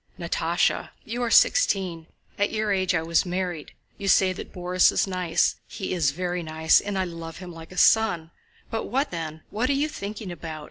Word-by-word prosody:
"Natásha, - - 0 0.2
you 235 +3 -4
are 240 - 0
sixteen. 190 - +3 0.3
At 205 - +2
your 215 -1 -1
age 190 -2 +1
I 160 - 0
was 165 0 +2
married. 180 -3 -4 0.3
You 200 - -4
say 190 -1 +4
Borís 180 -1 +1
is - - +1
nice. 180 -3 +1
He 190 - -4
is 165 -6 +2
very 175 +4 -2
nice, 160 0 +3
and 200 -1 -3
I 190 - +1
love 165 -2 -7
him 180 -1 -9
like 165 +1 -11
a 180 - -11
son. 175 -8 +4 0.4
But 225 -1 -2
what 270 +4 -1
then?... 160 -2 -5
What 230 +5 0
are - - +3
you 285 +2 +1
thinking 205 -7 -6
about? 160 -2 -7
180 Hz, 190 wpm, -25 LUFS, 165-205 Hz, 0.4 s, say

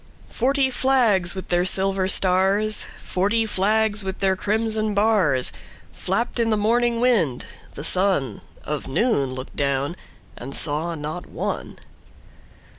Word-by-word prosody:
Forty 265 +2 +1
flags 230 -9 +2
with 190 - -7
their 175 0 +2
silver 190 0 +1
stars, 195 +3 +2 0.2
Forty 205 +5 +1
flags 215 +1 +1
with 190 0 -4
their 190 -1 +1
crimson 215 +1 -1
bars, 200 - +2 0.4
Flapped 235 +6 -1
in 230 -1 +2
the 215 - +2
morning 235 +2 +2
wind: 205 - +2 0.3
the 145 - -6
sunOf 150 - -2
noon 140 - +1
looked 130 0 -8
down, 140 +3 -1 0.4
and 135 +3 -8
saw 160 +3 -1
not 155 +3 -6
one. - - -4
195 Hz, 120 wpm, -23 LUFS, 165-220 Hz, 0.4 s, flags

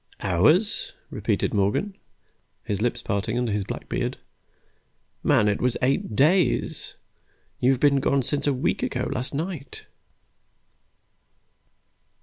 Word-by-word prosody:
"Hours?" 155 - +2 0.2
repeated - - -1
Morgan, 105 - 0 0.7
his 105 0 -2
lips 120 +1 -1
parting 100 +4 -1
under 125 -2 0
his 105 -1 0
black - - -6
beard. - - -2 1.0
"Man, 105 - +3
it 105 - 0
was 125 -1 +1
eight 130 -4 0
days! 165 - +2 0.6
You 125 - +3
have 135 -2 +2
been 140 -1 +4
gone 135 0 +1
since 140 +3 -1
a - - +4
week 135 +6 -1
ago 125 0 -1
last 125 -1 -3
night!" 155 -3 -5
125 Hz, 125 wpm, -25 LUFS, 105-145 Hz, 1.0 s, been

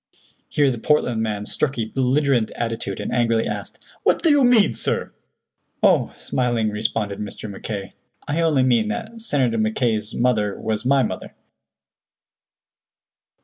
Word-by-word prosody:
Here 145 -2 +3
the 120 - -4
Portland 125 -5 +1
man 105 -2 -2
struck 140 +4 -2
a 115 - 0
belligerent 130 0 +1
attitude, 115 -4 -3
and - - -4
angrily 115 -2 +2
asked: - - -6 0.2
"What - - +2
do 330 - +5
you 290 -2 +5
mean, 230 - +5
sir?" - - -2 0.7
"Oh," - - +3
smilingly 120 -4 -1
responded 105 -1 -2
Mr. 105 +1 -6
Mackay, 100 -1 -6 0.3
"I 150 +3 0
only 155 -5 +3
mean 120 -4 +3
that 220 - -5
Senator 130 - +1
Mackay's 110 0 0
mother 110 -5 +1
was 110 +1 -2
my 135 0 +4
mother." - - -5
120 Hz, 140 wpm, -22 LUFS, 110-140 Hz, 0.7 s, do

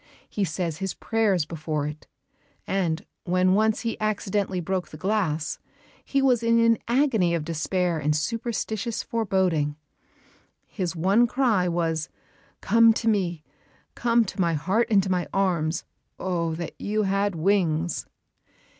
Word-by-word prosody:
He 205 - -2
says 170 -2 -2
his 190 +1 -3
prayers 205 -7 +1
before 155 -2 -3
it; 150 +1 -7 0.6
and, 180 -2 -1 0.2
when 185 0 +3
once 215 +2 +2
he 230 -1 -3
accidentally 205 -3 -1
broke 185 +1 -2
the 155 - -11
glass, 170 -6 -1 0.4
he 275 -1 0
was 250 -4 +3
in 230 0 +3
an 230 0 +4
agony 235 -9 +2
of 160 -3 -3
despair 170 +1 -1
and 150 +1 +1
superstitious 225 +4 -2
foreboding. 185 -9 0 0.9
His 180 -4 -4
one 195 +8 +3
cry 230 -8 +2
was, 165 -2 -1 0.5
"Come 230 +2 +5
to 230 - -3
me! 180 -7 0 0.5
Come 235 -1 +2
to 190 - -4
my 170 -2 +2
heart 190 +10 +1
and 200 -3 +4
to 190 - -2
my 180 -1 0
arms. 175 -4 0 0.3
Oh, 170 -3 -1
that 170 0 -5
you 215 +1 0
had 195 0 0
wings!" 170 -2 +1
190 Hz, 140 wpm, -25 LUFS, 165-220 Hz, 0.9 s, Come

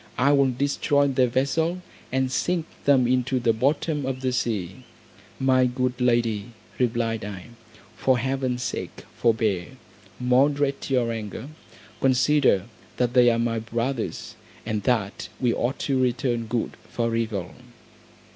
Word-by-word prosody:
I 135 +3 +4
will 140 -2 +4
destroy 140 +2 +1
their 130 -1 +3
vessel, 160 +8 0 0.3
and 130 0 0
sink 175 +4 0 0.2
them 135 -3 +5
into 130 +1 +1
the 115 -2 +2
bottom 145 +5 0
of 130 0 -3
the 130 -1 0
sea." 100 -7 -2 0.6
"My 130 -1 +4
good 125 0 -2
lady," 120 -2 +1 0.3
replied 115 -3 0
I, 100 +1 -7 0.5
"for 130 -1 +3
heaven's 130 0 -1
sake - - -5
forbear; 110 -6 0 0.4
moderate 140 +3 +2
your 125 -3 +1
anger, 110 +3 -6 0.5
consider 130 -6 +3 0.3
that 125 -1 +1
they 125 -2 +6
are 115 - +2
my 115 -1 0
brothers, 115 +2 -3 0.3
and 110 -2 -1
that 105 -5 -1
we 125 -3 +2
ought 125 +3 -1
to 135 -2 +1
return 120 -2 0
good 115 +1 -2
for 115 -1 -1
evil." 105 -6 -2
125 Hz, 135 wpm, -25 LUFS, 115-135 Hz, 0.6 s, they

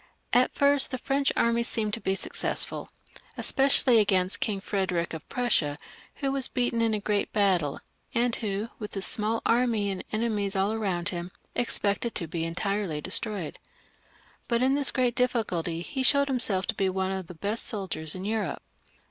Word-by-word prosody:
At 250 +1 +3
first 280 -1 +4
the 255 - -3
French 275 +2 +1
armies 235 0 +2
seemed 215 -3 0
to 230 - -2
be 190 - 0
successful, - - 0 0.5
especially 270 -3 +4
against 190 -2 +1
King 205 -3 -1
Frederick 190 -4 -1
of 160 - -8
Prussia, 215 - +1 0.4
who 275 -2 -1
was 270 -1 +2
beaten 245 -2 0
in 225 -1 +2
a - - -1
great 205 0 -1
battle, 185 -9 +1 0.4
and 235 0 +2
who, 210 +1 -3
with 210 -2 -6
his 195 - 0
small 225 0 0
army 230 -4 +2
and 190 - -5
enemies 215 -3 -1
all 195 +2 +2
around 190 -6 -1
him, 175 -1 -4 0.2
expected 225 -1 -1
to 170 - -1
be 165 +1 -3
entirely 185 -1 -2
de 185 - -7
stroyed. 205 -8 -1 0.9
But 235 0 +1
in 265 +1 +3
this 280 -1 +2
great 250 -2 +1
difficulty 180 -10 -1
he 265 +8 -4
showed 280 +2 +5
himself 215 -8 0
to - - -1
be 195 -1 0
one 190 0 -1
of 190 -2 -4
the 180 - -10
best 205 +7 -3
soldiers 190 -7 -2
in 185 +1 -5
Europe. 220 0 -2
210 Hz, 175 wpm, -27 LUFS, 190-240 Hz, 0.9 s, showed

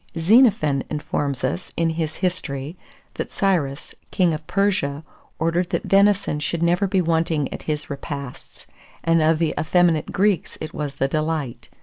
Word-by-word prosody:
Xenophon 170 - +4
informs 145 -3 -2
us, 180 - -2
in 165 -1 +2
his 160 -1 -3
History, 155 -5 -3 0.4
that - - -5
Cyrus, 165 - -1 0.2
king 180 -3 +2
of 155 0 -6
Persia, 180 -8 0 0.3
ordered 170 +2 0
that - - -1
venison 200 -5 +3
should 165 +3 -2
never 175 +4 +2
be 190 -1 +2
wanting 160 -3 0
at - - -6
his 150 -1 -2
repasts; 140 -2 -7 0.4
and 165 -1 +3
of 155 +1 +3
the 165 -1 0
effeminate 165 -1 +2
Greeks 200 -1 +1
it 155 - -6
was 145 -2 -4
the 135 -1 0
delight. 155 -3 -3
160 Hz, 150 wpm, -22 LUFS, 150-180 Hz, 0.4 s, Xenophon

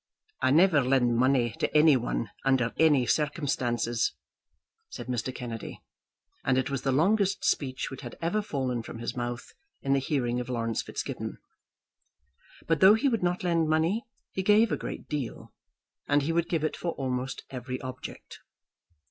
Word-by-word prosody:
"I - - +3
never 160 +1 +5
lend 125 -2 +3
money 125 -1 +3
to - - +1
any 150 -1 +7
one - - -2
under 130 -3 +2
any 150 -6 +5
circumstances," 130 -6 0 0.8
said - - -7
Mr. 125 0 -2
Kennedy, 115 -3 -6 0.6
and 130 -1 +2
it 130 +1 0
was 135 -2 -2
the 135 - 0
longest 195 +8 +2
speech 130 -2 0
which 135 - -7
had 120 -3 -8
ever 175 +6 0
fallen 130 - -2
from 115 - -9
his 120 +1 -4
mouth 120 0 -4 0.3
in 135 - +2
the 140 - +3
hearing 125 -3 -1
of 125 0 -5
Laurence 115 -2 -1
Fitzgibbon. - - -5 1.3
But 165 -2 +1
though 190 +5 +8
he 275 +5 +2
would 230 -4 0
not 180 0 0
lend 165 -3 +1
money, 170 +11 +1 0.2
he 190 - -2
gave 210 +3 +4
a - - +2
great - - -6
deal, 145 -6 -5 0.5
and 145 0 +3
he 165 +3 0
would 170 0 0
give 165 -3 0
it 155 - 0
for 170 -2 -3
almost 130 -1 -3
every 130 0 -5
object. 130 -1 -8
135 Hz, 165 wpm, -28 LUFS, 125-165 Hz, 1.3 s, though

